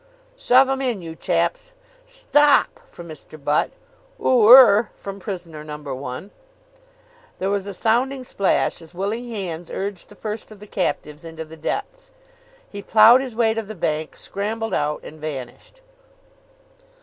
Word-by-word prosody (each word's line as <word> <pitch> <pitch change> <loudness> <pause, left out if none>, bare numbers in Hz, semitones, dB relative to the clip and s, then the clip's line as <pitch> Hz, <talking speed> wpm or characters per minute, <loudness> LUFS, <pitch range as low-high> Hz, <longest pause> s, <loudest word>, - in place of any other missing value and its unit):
"Shove 265 - +4
'em 270 0 -1
in, 240 -8 -2
you 165 -1 -7
chaps." - - -1 0.3
"Stop!" 485 -4 +3
From 175 - -12
Mr. 155 0 -10
Butt. 145 +2 +1 0.5
"Oo 235 -4 +4
er!" 235 -4 +9
From 195 0 -8
prisoner 175 -6 -7
number 150 -2 -7
one. 130 +8 -7 1.1
There 190 +1 -1
was 200 -1 -1
a 200 - -5
sounding 255 +6 0
splash 200 -7 0
as 165 +1 -15
willing 215 +6 -3
hands 175 -6 -5
urged 195 -2 -5
the 205 - -14
first 215 +1 -6
of 215 -2 -13
the 210 - -11
captives 165 -6 -3
into 160 -1 -8
the 160 +1 -12
depths. - - -5 0.6
He 200 - -8
ploughed 225 +5 +7
his 255 -4 -6
way 225 -1 +2
to 225 - -2
the 215 0 -9
bank, 155 -2 -2
scrambled 220 +3 -4
out, 150 0 -1
and 155 0 -11
vanished. 140 - -8
200 Hz, 150 wpm, -22 LUFS, 160-240 Hz, 1.1 s, er